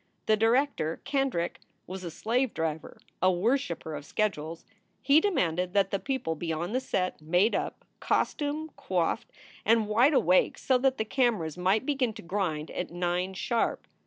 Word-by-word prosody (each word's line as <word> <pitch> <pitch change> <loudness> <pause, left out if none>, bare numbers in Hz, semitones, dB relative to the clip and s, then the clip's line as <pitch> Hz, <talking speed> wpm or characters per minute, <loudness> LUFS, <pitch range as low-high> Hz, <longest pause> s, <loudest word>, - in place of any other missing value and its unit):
The 215 - +4
director, 225 - +1
Kendrick, 270 -11 -1 0.3
was 185 +1 -7
a 175 - -4
slave 235 +9 -1
driver, 160 -1 -3 0.2
a 185 +1 +5
worshiper 180 - -1
of 145 -1 -5
schedules. 165 -4 -2 0.3
He 285 +4 +5
demanded 180 - 0
that 195 -1 +3
the 195 - 0
people 260 -12 -2
e 165 - -1
on 170 +4 -2
the 255 - +2
set 185 -10 -2
made 180 +8 +2
up, - - -3
costumed, 300 +1 -1
coiffed, 175 -3 -1 0.3
and 225 0 +3
wide 245 +8 +4
awake, 180 -6 +3
so 260 -1 +2
that 265 0 +2
the 220 - -1
cameras 215 - +1
might 190 +7 +1
begin 265 -5 0
to - - -10
grind 170 -5 -2
at 180 - -4
nine 180 +2 -1
sharp. 230 +4 -1
195 Hz, 160 wpm, -28 LUFS, 170-255 Hz, 0.3 s, a